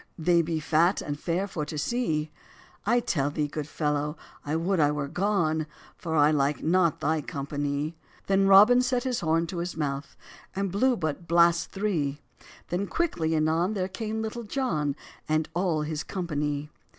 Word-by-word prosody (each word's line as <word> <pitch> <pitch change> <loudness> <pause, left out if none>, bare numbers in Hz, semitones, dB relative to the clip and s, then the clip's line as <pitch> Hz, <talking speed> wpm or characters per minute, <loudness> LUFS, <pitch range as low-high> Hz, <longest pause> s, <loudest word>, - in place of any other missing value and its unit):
They 170 +1 +3
be 165 -1 -2
fat 165 +5 +2
and 145 0 -4
fair 175 +4 -1
for 165 -5 -4
to 150 +1 -5
see;" 155 - -1 0.6
"I 240 +2 +4
tell 145 - 0
thee, 150 0 -1
good 145 0 -5
fellow, 150 0 -1 0.3
I 150 +2 -2
would 175 +3 0
I 145 -1 +4
were 150 -1 -2
gone, 165 -3 0 0.3
For 160 -2 -4
I 150 0 +5
like 145 -1 +1
not 170 -1 +2
thy 160 0 +1
company." 145 +2 -3 0.3
Then 195 0 +3
Robin 210 +6 +8
set 250 0 0
his 255 -2 -1
horn 165 0 +1
to 175 +2 -6
his 175 0 -4
mouth, 140 -2 -3 0.4
And 195 -1 -1
blew 245 +6 +2
but 160 0 -3
blasts 170 0 +4
three; 165 -9 -1 0.5
Then 185 +3 -1
quickly 165 - 0
anon 160 +6 +1
there 185 -2 -1
came 220 +2 -4
Little 220 +2 -4
John, 170 - -1 0.3
And 155 0 +1
all 170 -3 0
his 155 0 -3
company. 150 -5 -3
165 Hz, 170 wpm, -27 LUFS, 150-195 Hz, 0.6 s, Robin